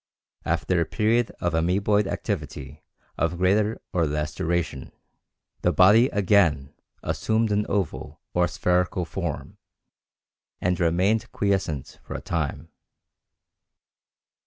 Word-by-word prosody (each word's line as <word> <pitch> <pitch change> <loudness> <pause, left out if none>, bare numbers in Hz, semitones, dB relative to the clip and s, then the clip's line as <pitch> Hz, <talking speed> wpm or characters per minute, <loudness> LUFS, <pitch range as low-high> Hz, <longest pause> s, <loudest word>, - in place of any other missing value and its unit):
After 90 -2 +1
a - - +1
period 115 +5 +1
of 85 -2 -1
amoeboid 100 +5 +2
activity 75 -7 -5 0.4
of 85 +1 0
greater 105 +4 +2
or 85 -3 +2
less 75 +1 -2
duration, 85 -5 -2 0.7
the - - +2
body 105 +7 +6
again 90 - +2 0.3
assumed 110 0 0
an 105 +1 +1
oval 100 -5 -2
or 90 0 +3
spherical 90 +3 0
form 80 - -5 1.0
and 90 -1 0
remained 90 +6 +1
quiescent 95 -9 -2
for - - -8
a - - -3
time. 80 0 -3
90 Hz, 110 wpm, -25 LUFS, 80-105 Hz, 1.0 s, body